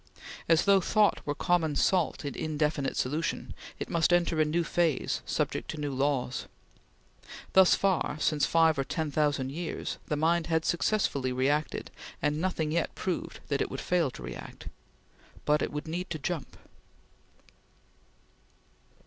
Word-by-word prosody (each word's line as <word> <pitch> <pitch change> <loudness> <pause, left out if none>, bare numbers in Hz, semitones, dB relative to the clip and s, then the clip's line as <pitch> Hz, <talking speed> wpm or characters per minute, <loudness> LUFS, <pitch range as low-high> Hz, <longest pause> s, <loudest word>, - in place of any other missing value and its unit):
As 165 +1 +4
though 200 -1 +5
thought 210 +3 +3
were 145 - -1
common 165 -3 +1
salt 180 -5 +1
in 140 - -3
indefinite 150 -3 -1
solution 150 +5 -2 0.2
it - - -4
must 165 0 +2
enter 170 -2 +3
a - - +4
new 165 +3 +1
phase 165 -4 0
subject - - -1
to 160 - -4
new 145 -2 -2
laws. 135 -2 -1 1.1
Thus 190 -1 +7
far, 185 -6 0
since 150 -1 +2
five 160 -3 +4
or - - +2
ten 155 +1 -3
thousand 145 -3 +1
years, 165 +2 -4
the 150 - 0
mind 165 +2 +2
had 160 -1 +1
successfully 165 -8 +1
reacted, 140 +4 0 0.3
and 150 +1 0
nothing 165 -4 -1
yet 170 +1 -1
proved 185 -2 -3
that 140 -1 0
it - - -1
would 135 - -5
fail 175 -5 +1
to 65 - -10
react - - -8 0.8
but 150 0 +3
it - - -1
would 150 +2 -5
need 180 +3 -4
to 160 - -3
jump. 160 +1 -4
155 Hz, 150 wpm, -29 LUFS, 145-170 Hz, 1.1 s, Thus